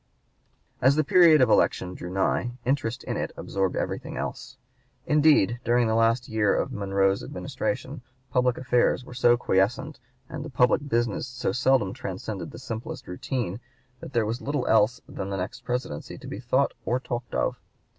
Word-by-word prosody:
As 130 Hz, +3 st, +5 dB
the 155 Hz, -, +3 dB
period 160 Hz, -1 st, +6 dB
of 125 Hz, -, +5 dB
election 90 Hz, -1 st, +2 dB
drew 90 Hz, -, -7 dB
nigh, 95 Hz, +6 st, 0 dB
interest 125 Hz, -2 st, -1 dB
in -, -, -3 dB
it -, -, -3 dB
absorbed 95 Hz, -1 st, -1 dB
everything -, -, -3 dB
else; -, -, -5 dB, 0.5 s
indeed 150 Hz, -, +4 dB
during 120 Hz, 0 st, +3 dB
the 110 Hz, -, +1 dB
last 115 Hz, +2 st, +2 dB
year 110 Hz, -2 st, +2 dB
of -, -, -1 dB
Monroe's 95 Hz, -1 st, +1 dB
Administration -, -, -4 dB, 0.3 s
public 125 Hz, -1 st, +2 dB
affairs 125 Hz, 0 st, +1 dB
were -, -, -10 dB
so 120 Hz, -1 st, +4 dB
quiescent 120 Hz, +8 st, 0 dB, 0.3 s
and 150 Hz, -2 st, -6 dB
the 155 Hz, -, -7 dB
public 130 Hz, +2 st, +2 dB
business 120 Hz, 0 st, 0 dB
so 130 Hz, -1 st, -2 dB
seldom 125 Hz, -6 st, +2 dB
transcended 95 Hz, -1 st, -5 dB
the -, -, -10 dB
simplest 125 Hz, +1 st, -6 dB
routine, 100 Hz, +2 st, -3 dB, 0.4 s
that -, -, -10 dB
there 115 Hz, -2 st, +2 dB
was 115 Hz, +3 st, -3 dB
little 145 Hz, -2 st, -2 dB
else 110 Hz, +2 st, +3 dB
than 95 Hz, 0 st, -5 dB
the 100 Hz, -, -2 dB
next 95 Hz, +7 st, -5 dB
Presidency 120 Hz, -11 st, -4 dB
to -, -, -12 dB
be 100 Hz, -, -6 dB
thought 130 Hz, +3 st, +1 dB
or 125 Hz, +2 st, 0 dB
talked 120 Hz, -2 st, -5 dB
of. -, -, 0 dB
120 Hz, 170 wpm, -26 LUFS, 105-130 Hz, 0.5 s, period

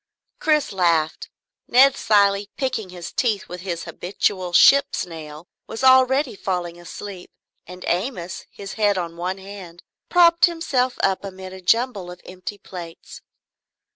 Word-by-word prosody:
Chris 305 Hz, -2 st, +1 dB
laughed. 170 Hz, -5 st, +1 dB, 0.4 s
Ned 270 Hz, +2 st, +6 dB
Cilley, 200 Hz, -3 st, +2 dB
picking 230 Hz, -7 st, -2 dB
his 175 Hz, -1 st, -8 dB
teeth 220 Hz, -6 st, 0 dB
with 180 Hz, 0 st, -8 dB
his 175 Hz, -3 st, -4 dB
habitual 180 Hz, +1 st, -2 dB
ship's 280 Hz, +10 st, +5 dB
nail, 160 Hz, -1 st, -10 dB, 0.2 s
was 225 Hz, -, -6 dB
already 260 Hz, -1 st, +4 dB
falling 175 Hz, -3 st, -4 dB
asleep, 185 Hz, +1 st, -9 dB, 0.4 s
and 180 Hz, +1 st, -10 dB
Amos, 180 Hz, -1 st, -3 dB
his 195 Hz, -1 st, -9 dB
head 205 Hz, -2 st, +3 dB
on 170 Hz, -2 st, -4 dB
one 180 Hz, +2 st, -3 dB
hand, 190 Hz, -3 st, -11 dB, 0.3 s
propped 340 Hz, -1 st, +6 dB
himself 285 Hz, -7 st, -1 dB
up 195 Hz, 0 st, +1 dB
amid 190 Hz, -1 st, -8 dB
a 190 Hz, -, -10 dB
jumble 215 Hz, -1 st, +1 dB
of 180 Hz, 0 st, -10 dB
empty 185 Hz, +3 st, -8 dB
plates. 175 Hz, -4 st, -10 dB
190 Hz, 140 wpm, -22 LUFS, 175-245 Hz, 0.4 s, Ned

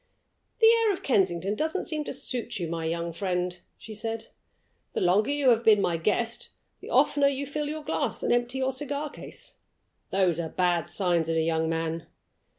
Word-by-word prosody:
"The 450 Hz, -, +4 dB
air 455 Hz, -1 st, +6 dB
of 375 Hz, -, -4 dB
Kensington 195 Hz, -5 st, +1 dB
doesn't 315 Hz, -, -1 dB
seem 310 Hz, -3 st, -2 dB
to -, -, -4 dB
suit 245 Hz, -4 st, -2 dB
you, 175 Hz, -3 st, -2 dB
my 165 Hz, 0 st, -3 dB
young 170 Hz, +1 st, -2 dB
friend," 180 Hz, -1 st, -2 dB, 0.2 s
she 220 Hz, -, -10 dB
said. 225 Hz, +1 st, -4 dB, 0.6 s
"The -, -, -1 dB
longer 190 Hz, +6 st, +3 dB
you 285 Hz, -2 st, +3 dB
have 230 Hz, -1 st, +4 dB
been 215 Hz, -2 st, +6 dB
my 175 Hz, -4 st, +1 dB
guest, 225 Hz, +7 st, 0 dB, 0.3 s
the -, -, -10 dB
oftener 285 Hz, -1 st, +4 dB
you 280 Hz, 0 st, -1 dB
fill 290 Hz, +1 st, -3 dB
your 310 Hz, 0 st, -5 dB
glass -, -, -2 dB
and -, -, +2 dB
empty 245 Hz, +2 st, 0 dB
your 265 Hz, 0 st, +1 dB
cigar 285 Hz, +2 st, -3 dB
case. -, -, -9 dB, 0.5 s
Those 185 Hz, -4 st, +2 dB
are 165 Hz, -1 st, -2 dB
bad 175 Hz, -1 st, +1 dB
signs 175 Hz, -4 st, +1 dB
in 165 Hz, -, +1 dB
a -, -, +3 dB
young 160 Hz, 0 st, +1 dB
man. 165 Hz, 0 st, -2 dB
210 Hz, 190 wpm, -27 LUFS, 170-280 Hz, 0.6 s, air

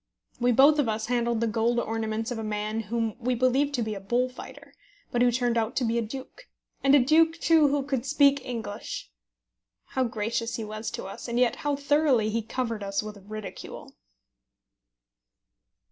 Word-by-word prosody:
We 245 Hz, 0 st, +3 dB
both 280 Hz, +5 st, +6 dB
of 265 Hz, -6 st, +2 dB
us 220 Hz, 0 st, -2 dB
handled 235 Hz, -1 st, 0 dB
the 230 Hz, -, +2 dB
gold 230 Hz, +2 st, +1 dB
ornaments 225 Hz, 0 st, -2 dB
of 235 Hz, -, -3 dB
a -, -, -4 dB
man 215 Hz, +1 st, -2 dB
whom 225 Hz, +1 st, -2 dB
we 250 Hz, +1 st, 0 dB
believed 265 Hz, +4 st, +2 dB
to 240 Hz, -, 0 dB
be 215 Hz, -1 st, -3 dB
a 200 Hz, -, -5 dB
bullfighter, 245 Hz, +6 st, -3 dB, 0.4 s
but 240 Hz, -, +1 dB
who 245 Hz, 0 st, +5 dB
turned 240 Hz, -1 st, +1 dB
out 225 Hz, +2 st, -2 dB
to 260 Hz, -, +1 dB
be 230 Hz, +1 st, +1 dB
a -, -, 0 dB
duke, 265 Hz, -, -8 dB, 0.4 s
and 275 Hz, +1 st, +6 dB
a -, -, +7 dB
duke, 320 Hz, +5 st, +4 dB
too, 320 Hz, -3 st, +5 dB
who 285 Hz, 0 st, +1 dB
could 265 Hz, -2 st, -2 dB
speak 280 Hz, -1 st, +4 dB
English! 220 Hz, -, -6 dB, 0.8 s
How 260 Hz, -, 0 dB
gracious 230 Hz, 0 st, -2 dB
he 225 Hz, -, -4 dB
was 215 Hz, +1 st, -5 dB
to -, -, -6 dB
us, 195 Hz, -, -8 dB
and 235 Hz, 0 st, -2 dB
yet 245 Hz, -1 st, +2 dB
how 290 Hz, -1 st, -1 dB
thoroughly 280 Hz, -6 st, +2 dB
he 230 Hz, +1 st, 0 dB
covered 230 Hz, -1 st, -3 dB
us 195 Hz, +1 st, -1 dB
with 210 Hz, -2 st, -9 dB
ridicule! 215 Hz, -1 st, -8 dB
235 Hz, 185 wpm, -27 LUFS, 220-265 Hz, 0.8 s, a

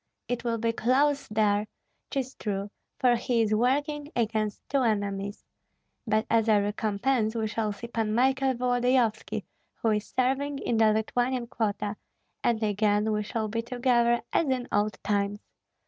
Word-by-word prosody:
It 245 Hz, -1 st, -2 dB
will 230 Hz, -1 st, 0 dB
be 230 Hz, +1 st, +1 dB
close 275 Hz, +5 st, +2 dB
there, 210 Hz, -1 st, +1 dB, 0.4 s
'tis 265 Hz, -2 st, -2 dB
true, 200 Hz, -1 st, -4 dB, 0.3 s
for 250 Hz, -2 st, +4 dB
he 235 Hz, -1 st, +1 dB
is 215 Hz, -1 st, 0 dB
working 290 Hz, +6 st, 0 dB
against 215 Hz, -3 st, -1 dB
two 275 Hz, -1 st, +1 dB
enemies; 200 Hz, -3 st, -1 dB, 0.6 s
but 215 Hz, +1 st, +2 dB
as 225 Hz, -1 st, +2 dB
a 215 Hz, -2 st, +5 dB
recompense 215 Hz, +3 st, 0 dB
we 225 Hz, -1 st, 0 dB
shall 220 Hz, 0 st, -1 dB
see 205 Hz, +3 st, -7 dB
Pan 225 Hz, -2 st, -1 dB
Michael 265 Hz, +1 st, +2 dB
Volodyovski, 245 Hz, -3 st, +1 dB, 0.3 s
who 225 Hz, -, 0 dB
is 210 Hz, -1 st, -1 dB
serving 270 Hz, +3 st, +1 dB
in 235 Hz, -4 st, -1 dB
the 220 Hz, -1 st, +5 dB
Lithuanian 245 Hz, +3 st, 0 dB
quota, 210 Hz, -3 st, -2 dB, 0.5 s
and 230 Hz, -2 st, +1 dB
again 210 Hz, +1 st, +2 dB
we 210 Hz, 0 st, 0 dB
shall 215 Hz, +1 st, -2 dB
be 230 Hz, +2 st, -2 dB
together 240 Hz, -1 st, +2 dB
as 325 Hz, -, +2 dB
in 255 Hz, -1 st, -1 dB
old 205 Hz, 0 st, +1 dB
times. 205 Hz, 0 st, 0 dB
225 Hz, 155 wpm, -28 LUFS, 210-250 Hz, 0.6 s, a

